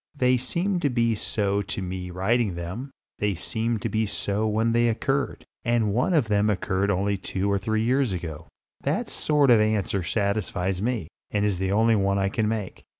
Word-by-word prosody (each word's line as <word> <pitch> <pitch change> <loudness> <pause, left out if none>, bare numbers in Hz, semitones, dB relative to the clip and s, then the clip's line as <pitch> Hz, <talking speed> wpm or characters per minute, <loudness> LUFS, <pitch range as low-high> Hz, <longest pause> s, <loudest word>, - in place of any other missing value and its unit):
They 125 -2 +3
seem 170 +10 -1
to 150 -4 +1
be 115 -2 +2
so 100 -1 0
to 100 - -4
me 90 -1 -4
writing 100 +2 +1
them; 90 +11 -5 0.3
they 105 -2 0
seemed 110 +4 -2
to - - +1
be 110 0 0
so 100 +2 -1
when 110 +2 +1
they 120 +1 +3
occurred, 135 +4 -1 0.2
and 115 -4 +1
one 125 - +2
of 140 -8 +3
them 105 0 +2
occurred 95 0 0
only 100 +1 +1
two 95 +1 -1
or 100 - +2
three 110 +2 0
years 130 0 +2
ago. 80 -3 -5 0.3
That - - -1
sort 145 -4 +3
of 115 -3 +6
answer 105 -3 +1
satisfies 95 0 -1
me, 115 -7 -1 0.2
and 105 0 0
is 100 -4 0
the 95 0 0
only 110 +2 +4
one 100 -1 +1
I 95 0 +1
can 110 +1 0
make. 105 -3 -3
105 Hz, 195 wpm, -25 LUFS, 95-115 Hz, 0.3 s, of